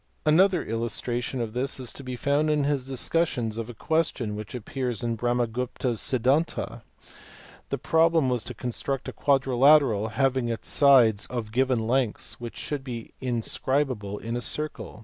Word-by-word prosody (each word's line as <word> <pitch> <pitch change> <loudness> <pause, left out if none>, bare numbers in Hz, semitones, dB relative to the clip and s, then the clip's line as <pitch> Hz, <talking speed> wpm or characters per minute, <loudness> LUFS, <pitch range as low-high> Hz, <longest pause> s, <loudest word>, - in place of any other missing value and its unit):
Another 175 +3 +4
illustration 120 +3 -2
of 110 -2 -4
this 130 +2 -2
is 125 -3 -5
to 140 - -9
be 130 -1 -5
found 145 +4 +1
in 150 -1 +2
his 140 -2 -1
discussion 135 -2 0
of 115 0 -5
a 120 - -8
question 135 -6 0
which 105 +3 -7
appears 125 0 -4
in 115 -1 -1
Brahmagupta 120 +2 -1
s 115 - -1
Siddhanta. 135 +6 0 0.9
The - - -1
problem 165 -3 +3
was 125 -3 0
to - - -7
construct 125 +2 -3
a - - -5
quadrilateral, 135 -4 +4
having 130 -1 +1
its 115 - -4
sides 120 -7 +5
of 115 -4 -5
given 125 -1 +1
lengths, 125 -2 -1
which 120 -1 -7
should 145 -3 -4
be 120 -4 -7
inscribable 125 -3 -1
in 115 +2 -4
a 120 - -2
circle. 150 -5 -2
125 Hz, 160 wpm, -26 LUFS, 115-140 Hz, 0.9 s, sides